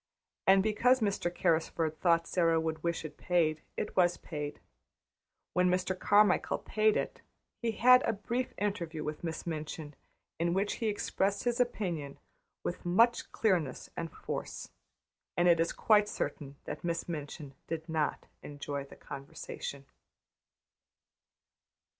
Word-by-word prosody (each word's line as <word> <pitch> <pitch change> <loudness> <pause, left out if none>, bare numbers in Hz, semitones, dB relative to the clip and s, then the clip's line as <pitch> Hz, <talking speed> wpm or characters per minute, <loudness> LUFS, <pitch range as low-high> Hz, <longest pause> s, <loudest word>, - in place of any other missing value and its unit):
And 190 0 +7
because 245 +4 +4
Mr. 200 -5 0
Carrisford 165 -2 0
thought 170 -2 +3
Sara 165 -2 +2
would 160 -1 -2
wish 170 -1 -1
it 150 -1 -8
paid, 160 -3 +1 0.2
it - - -3
was 175 -1 +4
paid. 150 -2 -5 0.9
When 180 0 +3
Mr. 185 +1 +1
Carmichael 205 -2 +4
paid 215 0 +2
it - - -3 0.4
he 230 -2 0
had 250 +3 +7
a 225 - +1
brief 235 +5 -2
interview 170 -6 -2
with 150 +2 -5
Miss 165 -2 -4
Minchin 155 -2 -5 0.5
in 170 +1 +1
which 200 +2 0
he 225 - +1
expressed 200 -1 0
his 240 -1 0
opinion 175 - -1 0.5
with 175 - -3
much 230 +7 +3
clearness 175 - 0
and 165 -2 -4
force; - - -5 0.7
and 175 0 +4
it 170 -1 +6
is 165 - +2
quite 210 -1 +4
certain 140 -3 -4
that - - -6
Miss 170 -1 -2
Minchin 150 -3 -6
did 160 0 -4
not 160 -2 -1 0.2
enjoy 145 -1 -5
the 140 - -13
conversation. 140 0 -7
175 Hz, 135 wpm, -32 LUFS, 155-205 Hz, 0.9 s, And